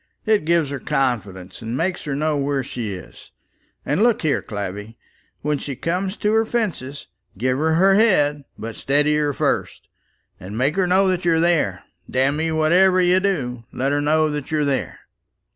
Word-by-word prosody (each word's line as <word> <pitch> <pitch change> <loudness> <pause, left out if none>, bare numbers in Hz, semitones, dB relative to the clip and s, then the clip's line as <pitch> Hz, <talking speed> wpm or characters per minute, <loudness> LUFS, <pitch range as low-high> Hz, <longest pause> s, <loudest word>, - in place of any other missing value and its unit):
It 215 -7 +2
gives 165 -3 +2
her 140 - -4
confidence, 100 -10 -2
and 115 +2 -4
makes 175 +3 -2
her 140 -2 -2
know 155 +1 0
where 140 -1 -1
she 120 -4 -5
is. 90 - -13 0.6
And - - 0
look 235 -4 +3
here, 155 -3 +1
Clavvy, 105 +2 -6 0.5
when 150 -1 0
she 140 -1 -5
comes 180 - -2
to 210 +1 0
her 225 0 +4
fences, 180 - -3 0.3
give 130 +4 0
her 160 +1 +2
her 190 +3 +5
head; 150 -10 +3
but 115 0 -6
steady 145 +2 +1
her 150 -1 +1
first, - - -2 0.5
and 100 +5 -7
make 135 +6 +1
her 190 -2 +1
know 190 +2 +3
that 185 -1 -1
you're 165 -2 +3
there. 155 - +1 0.3
Damme; 150 +5 0
whatever 180 +4 +4
you 180 +1 +4
do, 130 -12 -2
let 135 +2 -1
her 145 0 +1
know 155 +1 +2
that 150 -2 -5
you're 150 -2 0
there. 140 -2 -2
150 Hz, 175 wpm, -21 LUFS, 130-180 Hz, 0.6 s, her